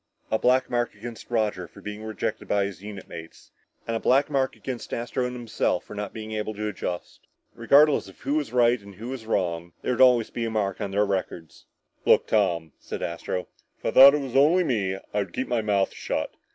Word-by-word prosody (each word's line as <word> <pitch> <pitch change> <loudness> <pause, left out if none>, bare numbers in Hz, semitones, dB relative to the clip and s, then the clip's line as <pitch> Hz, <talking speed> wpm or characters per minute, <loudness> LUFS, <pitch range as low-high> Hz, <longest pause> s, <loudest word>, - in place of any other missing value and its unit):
A 110 - +2
black 130 +1 +3
mark 120 -1 -1
against 120 -1 -9
Roger 105 -6 0
for - - -16
being 105 0 -7
rejected 110 -3 -4
by 100 -1 +2
his 100 -2 -7
unit 100 -2 -8
mates 80 0 -11 0.3
and 115 - -2
a - - 0
black 140 +6 +3
mark 135 -2 +1
against 130 -3 -5
Astro 120 +2 -2
and 125 - -6
himself 115 -6 -1
for - - -11
not 105 -1 -4
being 110 0 -7
able 110 0 -3
to 105 +1 -3
adjust. 90 -3 -5 0.3
Regardless 140 +4 +4
of 95 - -15
who 140 - -1
was 150 -6 -1
right 120 -1 +3
and 100 -1 -13
who 115 +5 -7
was 125 -4 -6
wrong, 85 -5 -1
there - - 0
would 120 - 0
always 125 -3 +5
be 120 - -3
a - - -1
mark 100 -3 -1
on 100 - -2
their 100 +2 +2
records. 90 -4 -4 0.4
"Look, - - +5
Tom," 85 -7 +1
said - - -6
Astro, 85 +2 -3 0.3
"if - - -18
I - - +1
thought 140 +2 +9
it 150 - -1
was 135 -2 -6
only 155 +7 +5
me 100 - 0 0.2
I'd 100 -4 -1
keep 130 - -2
my 120 -2 0
mouth 100 -2 +1
shut. - - -3
110 Hz, 220 wpm, -25 LUFS, 100-125 Hz, 0.4 s, thought